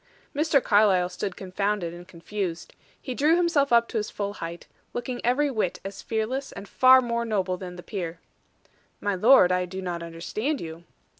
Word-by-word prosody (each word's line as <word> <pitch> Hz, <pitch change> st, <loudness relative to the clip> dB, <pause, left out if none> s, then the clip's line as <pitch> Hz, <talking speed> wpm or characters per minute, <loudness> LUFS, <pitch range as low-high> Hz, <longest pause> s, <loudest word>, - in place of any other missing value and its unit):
Mr. 295 Hz, -2 st, +3 dB
Carlyle 200 Hz, -4 st, +4 dB
stood 180 Hz, +1 st, -4 dB
confounded, 190 Hz, -2 st, -2 dB
and 175 Hz, +1 st, -11 dB
confused. 175 Hz, 0 st, -5 dB, 0.3 s
He 255 Hz, -, -5 dB
drew 300 Hz, +6 st, +3 dB
himself 335 Hz, -6 st, +2 dB
up 235 Hz, 0 st, +5 dB
to -, -, -3 dB
his 210 Hz, -1 st, -2 dB
full 200 Hz, 0 st, -4 dB
height, 170 Hz, -3 st, -7 dB, 0.3 s
looking 245 Hz, 0 st, -4 dB
every 275 Hz, +4 st, +2 dB
whit 215 Hz, -7 st, -1 dB
as 195 Hz, 0 st, -6 dB
fearless 235 Hz, +5 st, -2 dB
and 200 Hz, +1 st, -9 dB
far 260 Hz, +3 st, +6 dB
more 235 Hz, -1 st, -1 dB
noble 195 Hz, -5 st, -1 dB
than 180 Hz, -1 st, -8 dB
the 175 Hz, -, -10 dB
peer. 175 Hz, -4 st, -5 dB, 0.8 s
"My 205 Hz, -, -1 dB
lord, 195 Hz, -1 st, +6 dB
I 180 Hz, 0 st, +1 dB
do 185 Hz, +1 st, -7 dB
not 175 Hz, -2 st, -4 dB
understand 185 Hz, -, -3 dB
you." 165 Hz, +1 st, -8 dB
205 Hz, 175 wpm, -26 LUFS, 180-245 Hz, 0.8 s, far